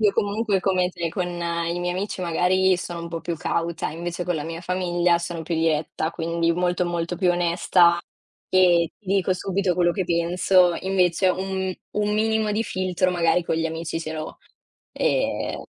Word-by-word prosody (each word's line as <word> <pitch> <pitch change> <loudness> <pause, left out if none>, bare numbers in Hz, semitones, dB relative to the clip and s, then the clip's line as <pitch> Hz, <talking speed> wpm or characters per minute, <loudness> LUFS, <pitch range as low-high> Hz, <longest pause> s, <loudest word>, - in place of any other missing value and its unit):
Io 210 -2 +4
comunque 205 0 0
come 185 -1 +1
te, 170 -1 -3
con 180 -1 -2
i 170 0 -2
miei 175 0 -1
amici 190 +1 -4
magari 180 +2 +2
sono 175 -1 -5
un 170 - -6
po' 165 -1 -5
più 170 -1 -3
cauta, 170 -1 -2
invece 170 +2 -4
con 175 0 -1
la 150 - -3
mia 165 +1 -5
famiglia 175 -1 +1
sono 170 -1 -5
più 165 +1 -3
diretta, 160 0 0
quindi 170 0 0
molto 180 +1 0
molto 170 0 -2
più 180 -3 +2
onesta 175 0 +3 0.5
e 175 -3 +4
ti 210 - -31
dico 190 -1 +2
subito 190 0 -1
quello 175 -1 +2
che 190 -1 -2
penso. 175 +1 +3
Invece 185 -1 +2
un 190 0 -1
m - - -2 0.3
un 210 0 0
minimo 220 0 +1
di 220 +2 0
filtro 185 -2 0
magari 175 0 +2
con 165 - -1
gli 165 0 0
amici 165 0 -4
ce 160 -1 -5
l'ho, 155 0 -6 0.5
ehm - - -1
175 Hz, 180 wpm, -23 LUFS, 170-185 Hz, 0.5 s, Io